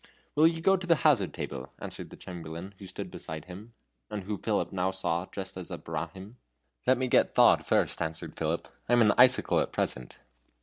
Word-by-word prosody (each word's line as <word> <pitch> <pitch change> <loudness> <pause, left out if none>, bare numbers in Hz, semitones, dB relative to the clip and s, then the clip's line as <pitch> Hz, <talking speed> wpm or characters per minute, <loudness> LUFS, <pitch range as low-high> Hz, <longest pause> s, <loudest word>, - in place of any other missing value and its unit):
"Will 155 +2 +6
you 165 0 -1
go 195 +3 +4
to 180 -1 -7
the 165 - +6
hazard 120 - +4
table?" 65 +1 -6
whispered - - -7
the - - -11
Chamberlain, 85 +2 -8
who 95 - -9
stood 90 - -6
beside 80 -1 -7
him, 100 +6 -11 0.3
and 105 -2 -4
who 105 +1 -4
Philip 105 -2 0
now 95 -1 0
saw 95 -3 -1
was 95 - -8
dressed 95 -1 -6
as 90 - -7
a - - -4
Brahmin. 95 - -6 0.5
"Let 130 0 +5
me 130 - 0
get - - +3
thawed - - +6
first," - - +1
answered 80 -1 -4
Philip; - - -2 0.2
"I - - +4
am 120 - +6
an 105 - +5
icicle 130 +1 +5
at - - -1
present." 60 -1 -3
95 Hz, 210 wpm, -29 LUFS, 85-120 Hz, 0.5 s, Will